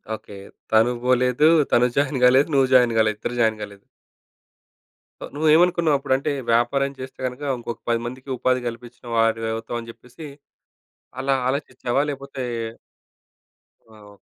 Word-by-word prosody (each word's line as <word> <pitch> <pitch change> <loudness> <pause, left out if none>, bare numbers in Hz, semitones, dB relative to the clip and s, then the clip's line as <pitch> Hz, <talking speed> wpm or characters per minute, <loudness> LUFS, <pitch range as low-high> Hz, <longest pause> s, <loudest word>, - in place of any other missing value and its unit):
Okay. 100 -2 -12 0.3
తనూ 115 +3 +4
బోలేదు, 125 +3 +3 0.2
తను 125 +1 +4
join 140 -1 +1
కాలేదు 130 +3 +5
నువ్వు 135 -1 +4
జాయిన్ 125 -2 +5
కాలేదు. 110 -1 +2
ఇద్దరు 120 - -4
జాయిన్ 110 -1 +1
కాలేదు. 100 -1 -11 1.4
ఓహ్! - - -8
నువ్వు 155 +2 0
ఏమనుకున్నావప్పుడంటే 155 -6 +2 0.2
వ్యాపారం 135 +4 +1
చేస్తే 130 0 -9
గనుక 125 +2 -5 0.2
ఇంకొక 120 -1 -7
10 115 -1 +2
మందికి 130 +3 -8
ఉపాధి 130 +1 +1
కల్పించిన 120 +1 -9
వారివవుతాం 115 +1 -1
అని 115 0 -10
చెప్పేసి 125 +7 -13 0.9
అలా 135 +1 +1 0.2
ఆలోచించావా? 130 -2 -2
లేకపోతే 140 -1 -7 1.5
ఆ! - - -16 0.2
ఒ - - -16
125 Hz, 130 wpm, -22 LUFS, 115-135 Hz, 1.5 s, కాలేదు